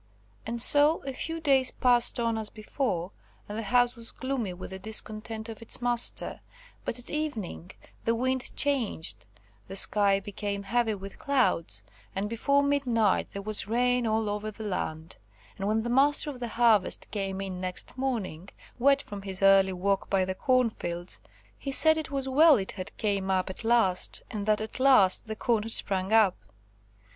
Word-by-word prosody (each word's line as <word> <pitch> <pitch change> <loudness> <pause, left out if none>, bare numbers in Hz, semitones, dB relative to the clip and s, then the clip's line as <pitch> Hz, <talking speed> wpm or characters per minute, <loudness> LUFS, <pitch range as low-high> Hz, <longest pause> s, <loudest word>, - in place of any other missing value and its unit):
And 235 +1 -3
so 290 +6 +5
a 270 - -4
few 325 +5 -4
days 270 -5 +3
passed 245 0 +2
on 230 -1 0
as 220 -1 -3
before, 210 -5 -3 0.4
and 205 - -6
the 225 - -3
house 245 +3 +2
was 230 -1 -2
gloomy 260 -7 -3
with 180 +1 -9
the 190 - -7
discontent 220 +1 -4
of 225 -1 -9
its 230 - 0
master, 245 -1 0 0.4
but 235 - -1
at 245 - -3
evening, 240 - -4 0.3
the 230 - +1
wind 260 +2 -1
changed, 220 - -1 0.4
the - - -7
sky 200 0 +4
became 200 0 -5
heavy 225 +1 0
with 195 0 -10
clouds 170 - 0 0.3
and 205 +3 -3
before 280 +5 +2
midnight 250 -8 +1
there 200 - -7
was 215 0 +1
rain 245 +1 +1
all 220 0 0
over 210 +1 -3
the 215 +1 -9
land; 165 -5 -4 0.4
and 195 - -2
when 220 +1 +1
the - - -4
Master 285 +4 +2
of 255 - -11
the 240 - -4
Harvest 230 -4 +2
came 195 -2 -3
in 190 -2 -5
next 185 +4 -6
morning, 215 -10 -3 0.3
wet 280 +3 +3
from 205 -6 -8
his 195 -1 -3
early 195 -1 +5
walk 195 +2 -1
by 190 -2 +2
the 190 - -3
corn 255 +3 +1
fields, 175 -2 -6 0.4
he 275 - -4
said 315 +3 +6
it 315 -3 -4
was 270 -1 -2
well 295 +2 +6
it 190 -2 -3
had 185 -2 -7
came 200 -3 -1
up 190 0 0
at 190 - -9
last, 225 -6 +1
and 210 -3 -5
that, 215 0 +2
at 220 +3 -5
last, 255 -8 +4
the 220 - -4
corn 230 -1 0
had 225 +2 -6
sprung 190 -2 +1
up. 220 -4 +4
220 Hz, 180 wpm, -28 LUFS, 195-250 Hz, 0.4 s, said